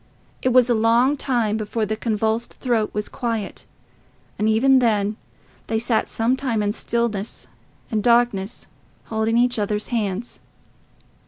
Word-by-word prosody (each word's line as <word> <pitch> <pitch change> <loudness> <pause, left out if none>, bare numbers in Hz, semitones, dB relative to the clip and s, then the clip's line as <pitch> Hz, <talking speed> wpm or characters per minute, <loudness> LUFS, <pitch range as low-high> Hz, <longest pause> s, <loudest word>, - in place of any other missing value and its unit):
It 255 - +2
was 250 -1 +5
a 245 - +3
long 230 +5 +3
time 235 -6 0
before 215 +1 -2
the 215 +1 -2
convulsed 220 +1 -1
throat 230 -4 0
was 210 0 -3
quiet, 230 -5 -4 0.7
and 215 +1 +2
even 260 +5 +5
then 210 -3 +1 0.5
they 225 - 0
sat 230 0 0
some 230 +3 +1
time 245 -6 -1
in 205 - +1
stillness 230 -2 -2 0.5
and 215 -2 +1
darkness, 235 -3 +1 0.4
holding 220 +1 0
each 245 -1 +3
other's 210 0 -2
hands. 220 -1 -2
225 Hz, 140 wpm, -22 LUFS, 215-240 Hz, 0.7 s, was